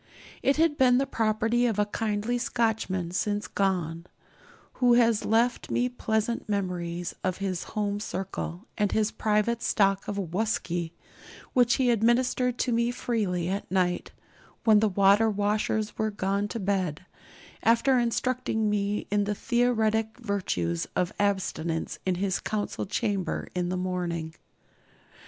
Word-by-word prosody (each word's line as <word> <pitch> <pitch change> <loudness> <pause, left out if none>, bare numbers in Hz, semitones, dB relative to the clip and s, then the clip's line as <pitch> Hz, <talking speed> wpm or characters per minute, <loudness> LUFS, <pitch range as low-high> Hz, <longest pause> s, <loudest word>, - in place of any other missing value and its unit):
It 275 - +2
had 320 -2 +2
been 250 -1 +5
the 270 - +2
property 225 0 +1
of 220 -3 -1
a 210 - +3
kindly 215 +3 -1
Scotchman 220 -8 -1
since 205 +2 -1
gone, 175 -4 -1 0.7
who 245 -1 +6
has 230 -3 +3
left 230 +3 +1
me 245 +1 +1
pleasant 225 -2 -2
memories 175 -3 -2
of 185 -1 -1
his 190 -3 -2
home 205 -1 0
circle 190 -1 -5
and 205 -1 +2
his 215 -1 +1
private 215 +2 0
stock 195 -2 +2
of 205 - -3
'whusky,' 175 -3 -2 0.6
which 245 -2 +4
he 255 -3 +3
administered 240 +2 +2
to 250 - 0
me 235 +1 +2
freely 210 -8 -1
at 195 +2 -3
night, 180 -1 0 0.5
when 215 -2 +6
the 215 0 +3
water 200 +3 +4
washers 210 +1 0
were 220 0 +1
gone 200 0 -1
to 230 - -5
bed, 185 -4 -1 0.6
after 235 +3 +4
instructing 235 -2 0
me 205 0 -1
in 205 0 +2
the 205 0 -1
theoretic 220 -2 +1
virtues 180 - -2
of 180 -1 0
abstinence 185 -5 -1
in 185 - +2
his 190 0 -1
council 210 -2 -3
chamber 200 -4 -2
in 180 -1 -1
the 185 - -1
morning. 175 -3 -3
210 Hz, 140 wpm, -27 LUFS, 185-230 Hz, 0.7 s, who